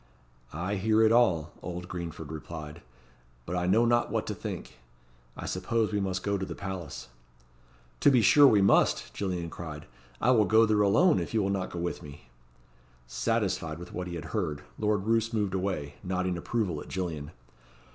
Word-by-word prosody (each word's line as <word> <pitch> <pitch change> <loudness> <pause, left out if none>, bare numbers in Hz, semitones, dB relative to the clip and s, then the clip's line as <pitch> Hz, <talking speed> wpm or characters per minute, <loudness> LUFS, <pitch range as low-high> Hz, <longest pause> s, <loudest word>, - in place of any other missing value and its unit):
"I 90 +6 -2
hear 110 +3 +3
it 110 - +5
all," 90 -10 +3
old 90 0 -6
Greenford 85 -3 -6
replied; 80 0 -8 0.6
"but 90 - -4
I 90 0 0
know 110 +6 +4
not 120 0 +2
what - - -1
to - - -3
think. - - -7 0.6
I - - -6
suppose 110 +4 -1
we 105 - +1
must 95 -1 -2
go 100 -1 0
to 95 - -2
the - - -6
palace." 80 -11 -6 0.9
"To - - +6
be 125 -5 +4
sure 145 +7 +8
we 105 -6 +5
must," 100 - +3
Gillian 90 -4 -3
cried; 75 -3 -7 0.3
"I 125 - +3
will 110 -4 +5
go 110 +2 +5
there 105 -1 +2
alone, 145 - +4
if - - -4
you 110 - +3
will 95 - 0
not 95 -2 -2
go - - -7
with 85 0 -3
me." 70 -4 -12 0.7
Satisfied 65 +6 -1
with 90 +1 -10
what 90 0 -4
he 85 - -5
had 80 - -6
heard, 80 -9 -2 0.2
Lord 105 -2 +1
Roos 115 +1 +1
moved 105 -4 0
away, 90 -7 -2
nodding 90 -1 -1
approval 90 -3 -2
at - - -10
Gillian. 85 -6 -4
95 Hz, 185 wpm, -29 LUFS, 85-105 Hz, 0.9 s, sure